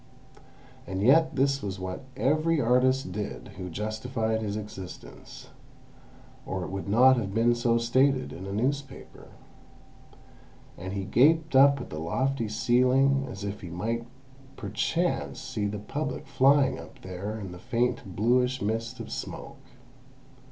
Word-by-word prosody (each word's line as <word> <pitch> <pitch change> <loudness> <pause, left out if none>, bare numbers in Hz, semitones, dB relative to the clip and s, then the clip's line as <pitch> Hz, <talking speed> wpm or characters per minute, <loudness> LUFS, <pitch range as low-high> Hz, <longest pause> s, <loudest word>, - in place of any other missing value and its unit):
And 95 +1 -2
yet 160 +6 +5
this 135 +1 +2
was 95 -1 -4
what 95 +6 -5
every 155 +4 +2
artist 125 -2 +2
did 105 +2 -5
who 90 0 -5
justified 110 +4 -2
his 105 -1 -2
existence—or 95 - -10
it - - -6
would 95 0 -5
not 130 +5 +6
have 100 -4 -3
been 115 +1 +4
so 120 0 +2
stated 130 +3 +2
in 95 +3 -8
a - - -5
newspaper. 135 +7 -3 1.5
And 95 +2 -6
he 100 -1 -3
gaped 160 - +3
up 140 +1 +7
at 125 - -8
the 75 - -5
lofty 120 +8 -1
ceiling, 130 +5 +3
as 95 +1 -7
if 100 0 -5
he 90 - -7
might 115 +7 -3 0.5
perchance 135 - -1
see 130 -6 -3
the 105 +1 -4
Public 135 +7 -4
flying 135 +1 +3
up - - -12
there 95 +4 -5
in 95 -3 -7
the 90 - -9
faint 120 -5 -1
bluish 125 +4 +2
mist 115 +2 -2
of - - -7
smoke. - - -7
115 Hz, 140 wpm, -27 LUFS, 100-135 Hz, 1.5 s, up